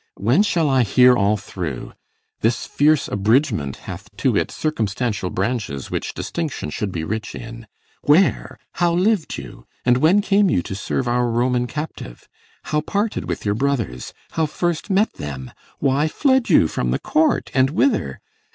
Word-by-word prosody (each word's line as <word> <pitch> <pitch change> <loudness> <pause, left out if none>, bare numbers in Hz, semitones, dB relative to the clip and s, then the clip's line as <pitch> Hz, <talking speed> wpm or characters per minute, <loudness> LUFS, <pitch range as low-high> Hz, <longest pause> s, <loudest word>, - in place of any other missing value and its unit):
When 120 - +3
shall 170 -7 +1
I 135 -2 +3
hear 125 +3 +5
all 105 -1 +2
through? 85 -9 -6 0.5
This 115 +1 0
fierce 150 0 +2
abridgment 105 - +1
Hath - - -8
to - - +1
it - - +1
circumstantial 110 -8 -2
branches, 95 - -3
which - - -3
Distinction 120 - -4
should 105 +4 -3
be 80 -3 -3
rich 110 +5 -4
in. 115 -1 -9 0.3
Where? 165 +6 +2
how 175 -1 +1
liv'd 190 0 +1
you? - - -10 0.2
And 125 0 +4
when 170 +9 +4
came 200 -1 +3
you 90 - +1
to - - -6
serve 115 +5 -2
our 120 0 +1
Roman 125 +1 +1
captive? 150 - -7 0.4
How 150 -1 -1
parted 205 +7 -2
with - - -4
your 100 - +2
brothers? 115 - -2 0.2
how 160 -1 0
first 175 +4 -2
met 200 +3 +2
them? 65 -3 -7 0.3
Why 140 +2 +1
fled 260 - +2
you 150 - +5
from 60 - -2
the 60 - +1
court? 160 +1 +1
and 130 0 +3
whither? 225 - 0
125 Hz, 160 wpm, -21 LUFS, 100-155 Hz, 0.5 s, hear